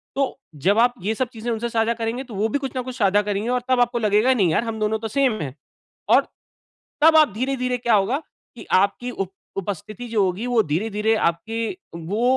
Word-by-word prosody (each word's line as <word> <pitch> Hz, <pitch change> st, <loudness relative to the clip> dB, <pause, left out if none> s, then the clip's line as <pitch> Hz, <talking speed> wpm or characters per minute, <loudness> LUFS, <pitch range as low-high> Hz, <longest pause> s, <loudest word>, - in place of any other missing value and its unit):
तो 275 Hz, 0 st, -1 dB, 0.2 s
जब 200 Hz, +4 st, +4 dB
आप 245 Hz, +1 st, +4 dB
ये 210 Hz, +5 st, 0 dB
सब 255 Hz, +1 st, -1 dB
चीज़ें 230 Hz, +1 st, -5 dB
उनसे 235 Hz, +1 st, -2 dB
साझा 225 Hz, 0 st, +1 dB
करेंगे 230 Hz, +3 st, -3 dB
तो 240 Hz, -4 st, -12 dB
वो 210 Hz, +3 st, +1 dB
भी 285 Hz, -, 0 dB
कुछ 270 Hz, -1 st, -4 dB
न 255 Hz, -, 0 dB
कुछ 255 Hz, 0 st, -7 dB
साझा 205 Hz, -1 st, +3 dB
करेंगी 205 Hz, +3 st, -2 dB
और 250 Hz, -1 st, +1 dB
तब 255 Hz, -, +3 dB
आपको 240 Hz, 0 st, +1 dB
लगेगा 215 Hz, +4 st, +3 dB
नहीं 195 Hz, -8 st, +2 dB
यार 160 Hz, -, +2 dB
हम 225 Hz, -1 st, -4 dB
दोनों 215 Hz, 0 st, 0 dB
तो 225 Hz, -, -4 dB
सेम 260 Hz, +1 st, +2 dB
है। 135 Hz, -4 st, -4 dB, 0.6 s
और -, -, +6 dB, 0.8 s
तब 320 Hz, +1 st, +7 dB
आप 305 Hz, -9 st, +5 dB
धीरे-धीरे 255 Hz, +1 st, -1 dB
क्या 235 Hz, -2 st, +2 dB
होगा 210 Hz, +8 st, +2 dB, 0.4 s
कि -, -, -10 dB
आपकी 200 Hz, +6 st, +2 dB
उप 195 Hz, -4 st, -4 dB, 0.2 s
उपस्थिति 205 Hz, +5 st, -5 dB
जो 220 Hz, -3 st, +1 dB
होगी 190 Hz, +6 st, -2 dB
वो 240 Hz, -3 st, +3 dB
धीरे-धीरे 210 Hz, +6 st, +1 dB
आपकी 220 Hz, +5 st, -1 dB, 0.4 s
वो 190 Hz, +8 st, -3 dB
225 Hz, 215 wpm, -22 LUFS, 205-245 Hz, 0.8 s, तब